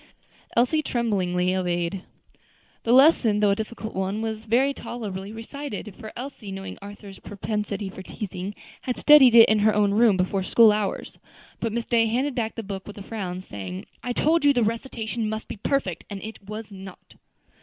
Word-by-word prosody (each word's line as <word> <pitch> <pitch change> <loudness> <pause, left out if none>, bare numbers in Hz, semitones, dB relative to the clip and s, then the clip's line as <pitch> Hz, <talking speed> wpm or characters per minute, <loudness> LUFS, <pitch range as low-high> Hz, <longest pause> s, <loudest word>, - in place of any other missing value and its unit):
Elsie 255 +6 +3
tremblingly 185 -9 0
obeyed. 175 0 -1 0.8
The 230 - +2
lesson, 255 -5 +5
though 205 -1 +4
a - - +2
difficult 220 +1 -6
one, 190 +3 -2
was 220 0 -4
very 255 +5 +2
tolerably 205 -7 -6
recited; 225 -1 -7
for 215 - -9
Elsie, 250 -6 -7
knowing 195 0 -7
Arthur's 200 -1 -10
propensity 205 0 -4
for 190 0 -8
teasing, 195 0 -6 0.3
had 250 - -3
studied 275 -5 +7
it 230 -1 +10
in 215 0 +3
her 210 0 +3
own 205 -1 +3
room 220 -2 +4
before 190 +1 0
school 220 +3 +6
hours. 210 -2 -3 0.4
But 230 - -2
Miss 235 +1 -2
Day 230 -2 +3
handed 260 +5 0
back 230 -3 -2
the 225 - -5
book 195 -1 -6
with 210 - -9
a 200 - -7
frown, 190 -4 -5
saying, 95 - -7 0.2
"I 245 - -3
told 315 +6 +2
you 285 -1 +6
the 245 -3 +2
recitation 225 -1 -2
must 220 0 -5
be - - -7
perfect, 200 - -1
and 200 -1 -6
it 220 +1 -8
was 215 0 -7
not." 190 -1 -12
215 Hz, 180 wpm, -25 LUFS, 195-235 Hz, 0.8 s, it